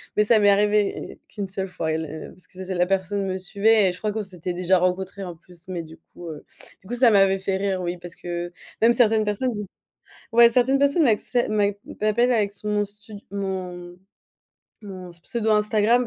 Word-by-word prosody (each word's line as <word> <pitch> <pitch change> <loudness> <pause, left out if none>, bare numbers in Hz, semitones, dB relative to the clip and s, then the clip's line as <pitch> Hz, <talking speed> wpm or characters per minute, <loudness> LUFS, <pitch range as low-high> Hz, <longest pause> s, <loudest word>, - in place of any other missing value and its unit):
mais 210 - +4
ça 220 +1 +4
m'est 205 0 +5
arrivée 205 0 +1
qu'une 200 -2 -5
seule 190 0 -4
fois 160 -3 -3
et 155 - 0
la 160 -1 -6
parce 185 - -14
que 185 +1 -9
c'est 185 0 -4
la 175 0 +3
personne 195 +1 -1
me 190 0 -2
suivait 200 +2 +3
et - - -1
je 180 - -9
crois 210 +2 -2
qu'on 220 +1 -3
s'était 180 -2 -5
déjà 180 +1 +2
rencontré 185 +2 -1
en 175 -2 -6
plus. 175 +1 -15
Mais 180 -2 -4
du 160 0 -12
coup, 170 +1 -13
heu, 150 -2 -9 0.3
du 190 - -19
coup 240 - -5
ça 245 -1 +5
m'avait 195 -1 +4
fait 190 0 -1
rire, 190 -1 -1
oui, 175 0 -3
parce 175 0 -8
que 175 0 -5 0.3
même 235 +1 +6
certaines 225 -3 +3
personnes 210 +5 -1 0.8
ouais, 235 0 +8
certaines 255 +3 +3
personnes 280 +3 +3
m'appellent- 240 +1 +1
m'a 210 -1 +3 0.3
m'appellent 235 +4 +2
avec 210 -4 +1
son 205 +1 -7
mon 205 0 +1
studio 205 0 -11
mon 180 -3 -5 0.8
mon 185 -3 -9
pseudo 215 +6 -3
Instagram, 215 +3 +3
195 Hz, 205 wpm, -24 LUFS, 180-215 Hz, 0.8 s, ouais